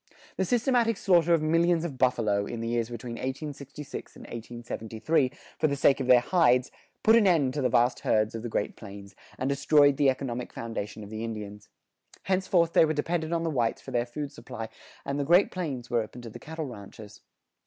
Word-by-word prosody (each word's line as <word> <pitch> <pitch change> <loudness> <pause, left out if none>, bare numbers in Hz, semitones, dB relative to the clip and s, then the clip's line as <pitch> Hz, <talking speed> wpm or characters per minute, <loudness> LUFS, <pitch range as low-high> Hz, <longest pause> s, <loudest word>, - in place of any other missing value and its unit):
The 190 - 0
systematic 240 -1 +2
slaughter 175 -4 +3
of 165 -2 +4
millions 165 +1 +2
of 140 -6 -6
buffalo, 110 -6 +1
in 120 - -5
the 115 - -3
years 120 -1 -1
between 120 0 -6
1866 140 +1 -6
and - - -12
1873, 120 +4 -2 0.3
for 155 - +3
the 140 - -1
sake 140 0 +3
of 130 - -2
their 125 -1 +7
hides, 125 -6 +3 0.3
put 220 - +6
an 225 -4 +5
end 150 -8 +3
to 150 - -2
the 125 - +2
vast 120 +1 +2
herds 110 0 +1
of 115 - -5
the 120 - -5
Great 105 - -2
Plains, 100 -2 -11 0.2
and 130 - -2
destroyed 145 0 +4
the 145 -2 +4
economic 125 -2 -3
foundation 110 -2 -5
of 100 - -11
the 110 +1 -5
Indians. 105 -2 -7 0.5
Henceforth 185 -3 +1
they - - +6
were 155 -1 +2
dependent 160 +2 -2
on 165 -1 0
the 165 - -1
whites 120 -5 0
for - - -8
their 120 0 0
food 145 +3 -5
supply, 115 -4 -8 0.4
and 140 +1 -2
the - - +1
Great 175 +7 +4
Plains 140 -10 -4
were 120 -1 +2
open 115 +3 -9
to 115 - -8
the - - -10
cattle 160 0 -6
ranchers. 105 -3 -11
130 Hz, 205 wpm, -28 LUFS, 115-160 Hz, 0.5 s, their